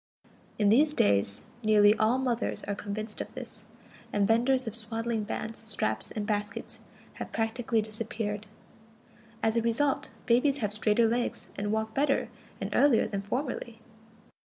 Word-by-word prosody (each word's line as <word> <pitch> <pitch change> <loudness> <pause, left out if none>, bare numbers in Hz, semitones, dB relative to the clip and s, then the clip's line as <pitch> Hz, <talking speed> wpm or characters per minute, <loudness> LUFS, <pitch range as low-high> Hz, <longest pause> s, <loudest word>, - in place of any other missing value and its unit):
In 205 -2 +3
these 295 +8 +5
days 100 - +2 0.2
nearly 210 -1 +6
all 220 +4 +3
mothers 250 -3 -1
are 205 - -2
convinced 210 +2 -5
of - - -6
this, 235 -4 -9 0.4
and 200 -1 +2
vendors 250 +4 +3
of 225 -1 -4
swaddling 225 0 -2
bands, 220 +2 -4
straps, 200 - -2
and 210 -2 -4
baskets 210 +2 -3 0.4
have - - -5
practically 225 0 0
disappeared. 215 -1 -4 1.0
As 225 +1 +2
a - - +4
result, 265 +5 +1 0.2
babies 255 +4 +3
have 210 -5 -1
straighter 215 +2 +3
legs 240 +2 -1
and 205 +1 -2
walk 220 0 -1
better 275 +2 +1 0.3
and - - -4
earlier 280 -5 +5
than 200 -1 -3
formerly. 240 +1 -3
225 Hz, 145 wpm, -29 LUFS, 210-235 Hz, 1.0 s, nearly